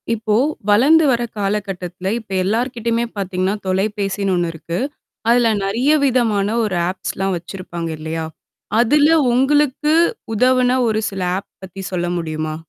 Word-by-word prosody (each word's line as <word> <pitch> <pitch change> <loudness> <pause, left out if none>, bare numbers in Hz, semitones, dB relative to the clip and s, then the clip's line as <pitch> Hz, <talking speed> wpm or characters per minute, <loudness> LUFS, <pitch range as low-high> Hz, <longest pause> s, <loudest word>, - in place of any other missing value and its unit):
இப்போ, 220 -1 0 0.3
வளர்ந்து 280 +10 +5
வர்ற 240 -2 +1
காலகட்டத்துல 195 -2 -3
இப்ப 220 -3 -16
எல்லார்கிட்டயுமே 235 +2 -1
பாத்தீங்கன்னா, 190 0 -1
தொலைபேசின்னு 195 0 -1
ஒண்ணு 175 -1 0
இருக்கு. 170 +2 -5 0.5
அதுல 235 -1 +4
நெறைய 235 +9 +1
விதமான 225 -6 +1 0.2
ஒரு 200 -4 -2
ஆப்ஸ்லாம் 190 0 -3
வச்சிருப்பாங்க. 175 -1 -6
இல்லையா? 160 +1 -4 0.5
அதுல 290 +5 +4 0.2
உங்களுக்கு 290 +3 +2 0.4
உதவுன 255 +2 +3
ஒரு 215 0 +1
சில 195 -1 -6 0.2
ஆப் 195 - -10 0.2
பத்தி 190 +1 -9
சொல்ல 175 -2 -1
முடியுமா? 155 -1 -3
205 Hz, 125 wpm, -19 LUFS, 185-240 Hz, 0.5 s, வளர்ந்து